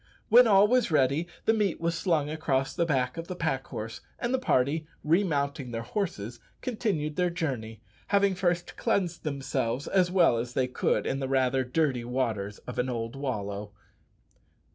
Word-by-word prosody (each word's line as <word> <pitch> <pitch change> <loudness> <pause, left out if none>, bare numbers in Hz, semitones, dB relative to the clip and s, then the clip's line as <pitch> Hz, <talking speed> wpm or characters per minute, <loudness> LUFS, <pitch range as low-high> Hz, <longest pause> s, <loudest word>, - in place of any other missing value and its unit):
When 240 +2 +8
all 200 -1 +6
was 250 0 +2
ready 150 +2 +2 0.2
the 225 - +4
meat 210 -5 0
was 170 0 0
slung 165 -4 +1
across 140 -4 -1
the 170 -2 0
back 130 -1 0
of 165 0 -5
the 180 - -5
pack 145 -6 -2
horse; 110 +1 -6 0.2
and 240 +1 -2
the 260 - +2
party, 150 - +1 0.2
remounting 145 -6 +1
their 115 -1 -4
horses, 120 - -3 0.2
continued 205 - -2
their 180 -1 +2
journey, 125 - -4 0.3
having 200 -1 +3
first 175 -1 -1
cleansed 185 -7 0
themselves 135 -3 -2
as 185 -2 +3
well 175 -10 +4
as 120 +1 -4
they 130 - +2
could 125 - 0
in 135 - -1
the 135 - -2
rather 130 -1 +2
dirty 130 -1 0
waters 115 -5 -2
of 125 - -5
an 125 +1 0
old 115 0 -3
wallow. 105 -7 -4
145 Hz, 170 wpm, -28 LUFS, 125-175 Hz, 0.3 s, When